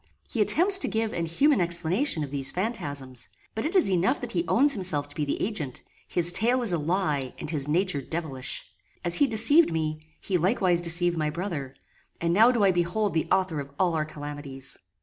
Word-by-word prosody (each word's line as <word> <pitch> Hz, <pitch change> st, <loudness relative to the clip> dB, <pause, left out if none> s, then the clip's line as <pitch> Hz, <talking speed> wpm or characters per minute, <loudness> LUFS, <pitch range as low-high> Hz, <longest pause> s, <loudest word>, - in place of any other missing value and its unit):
He 230 Hz, -, -2 dB
attempts 370 Hz, -, +4 dB
to -, -, +1 dB
give 220 Hz, -1 st, -2 dB
an 170 Hz, -1 st, -2 dB
human 275 Hz, -, +2 dB
explanation 175 Hz, -, +1 dB
of 140 Hz, -, -7 dB
these 140 Hz, -1 st, -2 dB
phantasms; 145 Hz, -, -5 dB, 0.2 s
but 220 Hz, -, -4 dB
it 330 Hz, +6 st, -3 dB
is 355 Hz, -, +3 dB
enough 185 Hz, +1 st, +1 dB
that -, -, -5 dB
he 170 Hz, -2 st, -2 dB
owns 280 Hz, +4 st, +4 dB
himself 170 Hz, -8 st, 0 dB
to -, -, -13 dB
be 150 Hz, -, -2 dB
the 140 Hz, -, -3 dB
agent; 160 Hz, -, -4 dB, 0.2 s
his 175 Hz, 0 st, +5 dB
tale 240 Hz, +7 st, +1 dB
is 210 Hz, -6 st, +1 dB
a 170 Hz, -, 0 dB
lie, 150 Hz, -5 st, -1 dB
and 150 Hz, -, -6 dB
his 145 Hz, -3 st, -3 dB
nature 170 Hz, -1 st, +1 dB
devilish. 135 Hz, -3 st, -4 dB, 0.4 s
As 175 Hz, -, +2 dB
he 285 Hz, -, +4 dB
deceived 235 Hz, -, +5 dB
me, 155 Hz, -1 st, -2 dB, 0.2 s
he 185 Hz, -3 st, -1 dB
likewise 180 Hz, -1 st, +1 dB
deceived 175 Hz, 0 st, +3 dB
my 155 Hz, -1 st, 0 dB
brother, 150 Hz, -5 st, -5 dB, 0.4 s
and 170 Hz, 0 st, 0 dB
now 225 Hz, +6 st, +6 dB
do 235 Hz, -4 st, 0 dB
I 195 Hz, -, +5 dB
behold 175 Hz, +4 st, -1 dB
the 160 Hz, -, -1 dB
author 185 Hz, -5 st, +1 dB
of 140 Hz, -1 st, -7 dB
all 180 Hz, -3 st, +2 dB
our 155 Hz, -1 st, -1 dB
calamities! 145 Hz, -3 st, -7 dB
175 Hz, 205 wpm, -26 LUFS, 150-210 Hz, 0.4 s, now